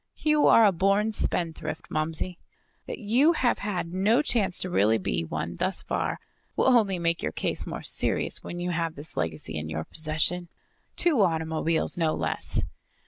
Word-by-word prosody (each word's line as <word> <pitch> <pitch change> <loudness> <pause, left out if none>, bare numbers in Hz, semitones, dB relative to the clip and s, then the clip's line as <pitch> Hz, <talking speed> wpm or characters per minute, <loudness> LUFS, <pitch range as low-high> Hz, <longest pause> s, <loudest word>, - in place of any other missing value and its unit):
"You 305 -1 +3
are 230 - +7
a 205 - +5
born 195 +4 +1
spendthrift, 165 -5 -2
Momsey. 160 +3 -1 0.5
That - - -5
you 255 +9 +3
have 255 -6 +1
had 180 -4 -3
no 215 +9 +2
chance 215 -10 +1
to 185 - 0
really 110 - +3
be 85 -4 -2
one 85 +1 -5
thus 190 - -1
far - - -2 0.4
will 260 - +4
only 200 -5 +3
make 170 -1 -1
your 75 - -2
case - - -1
more - - -6
serious - - +1
when 175 - -6
you 180 0 -2
have 165 -1 -2
this 145 +3 -10
legacy 80 -1 -3
in 80 +1 -6
your 80 0 -3
possession. 160 - -1 0.5
Two 320 -10 +3
automobiles, 160 -1 0
no 160 -2 +1
less!" - - 0
175 Hz, 170 wpm, -26 LUFS, 155-205 Hz, 0.5 s, are